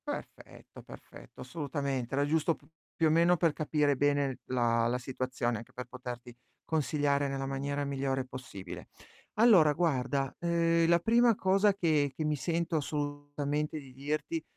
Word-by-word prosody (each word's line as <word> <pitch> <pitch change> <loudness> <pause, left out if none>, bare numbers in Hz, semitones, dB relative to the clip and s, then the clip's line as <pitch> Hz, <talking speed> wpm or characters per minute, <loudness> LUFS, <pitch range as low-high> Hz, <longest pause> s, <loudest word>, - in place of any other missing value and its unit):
Perfetto, - - -8
perfetto, - - -13
assolutamente. 140 -2 -3
Era 140 +1 +2
giusto 160 +2 +1
p - - -25 0.3
più 165 - +3
o - - +3
meno 170 +2 +5
per 165 -2 +2
capire 150 -2 +1
bene 145 -1 +1
la 115 -2 +1
la 120 +1 0
situazione, 125 -2 -2
anche 115 - -11
per 125 - -6
poterti 125 -1 -8 0.3
consigliare 145 -2 +1
nella 135 0 -3
maniera 140 +1 -2
migliore 135 -1 -1
possibile. 120 -8 -9 0.5
Allora 195 -10 +6
guarda, 135 -4 0
uhm, 170 -1 +2
la 170 0 +5
prima 230 +4 +4
cosa 195 +2 +3
che 155 -7 +2
che 155 - -3
mi 150 0 +1
sento 165 +3 -1
assolutamente 145 0 -3
di 135 -3 -13
dirti 150 +4 -3
145 Hz, 150 wpm, -31 LUFS, 135-160 Hz, 0.5 s, Allora